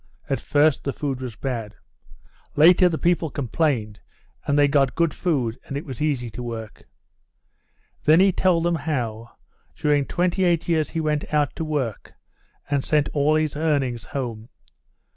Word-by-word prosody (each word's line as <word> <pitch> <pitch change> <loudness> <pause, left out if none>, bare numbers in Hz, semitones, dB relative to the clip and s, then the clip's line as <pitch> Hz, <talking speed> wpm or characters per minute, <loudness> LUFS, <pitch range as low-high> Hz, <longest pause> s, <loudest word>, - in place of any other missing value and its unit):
At - - +1
first 150 0 +2
the 140 - -2
food 135 -3 -3
was 125 -4 -6
bad. 115 -4 -4 0.8
Later 180 +4 +6
the 160 - -2
people 170 -1 +1
complained, 125 -6 -1 0.5
and 145 - +2
they 145 0 +5
got 140 -2 +2
good 170 -1 +1
food, 130 -10 -1
and 140 - -4
it 145 - -6
was 130 -3 -7
easy 140 -6 0
to 125 - -7
work." 115 -3 -7 1.2
Then 155 +2 +6
he 195 +1 +5
told 180 -2 +2
them 175 0 +1
how, 120 -8 -3 0.4
during 145 -2 +1
28 175 -1 +1
years 160 -3 +1
he 165 - -3
went 150 -1 -1
out 150 -2 +1
to - - -3
work, 145 -9 -3 0.5
and 140 -2 0
sent 150 -2 +1
all 150 +1 +2
his 155 -1 0
earnings 140 -7 0
home. 120 -5 -5
145 Hz, 160 wpm, -23 LUFS, 125-160 Hz, 1.2 s, Later